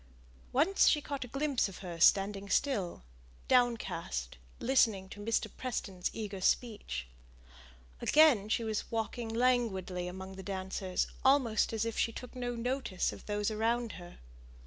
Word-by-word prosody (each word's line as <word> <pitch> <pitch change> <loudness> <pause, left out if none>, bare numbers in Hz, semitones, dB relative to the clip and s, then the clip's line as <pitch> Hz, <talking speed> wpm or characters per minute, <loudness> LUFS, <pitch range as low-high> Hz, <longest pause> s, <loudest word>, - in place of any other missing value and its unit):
Once 320 +10 +4
she 300 - +5
caught 280 -2 -4
a - - -8
glimpse 275 -3 0
of 190 - -10
her 170 -2 -6
standing 200 +3 +4
still 200 - 0 0.4
downcast 210 - 0 0.2
listening 225 -7 +3
to 200 - -11
Mr. 225 +2 0
Preston's 195 -8 -3
eager 205 -3 -5
speech. 185 - 0 1.0
Again 280 -10 +5
she 230 - +1
was 220 -2 -2
walking 225 +1 -3
languidly 225 -7 +1
among 190 +1 -7
the - - -6
dancers, 190 -1 -2 0.2
almost 260 -5 +3
as 225 0 -1
if 230 - -3
she 230 - +2
took 250 +2 -9
no 245 -1 -3
notice 240 -5 -1
of - - -12
those 210 0 0
around 230 +2 0
her. 175 -1 -11
220 Hz, 145 wpm, -32 LUFS, 190-245 Hz, 1.0 s, she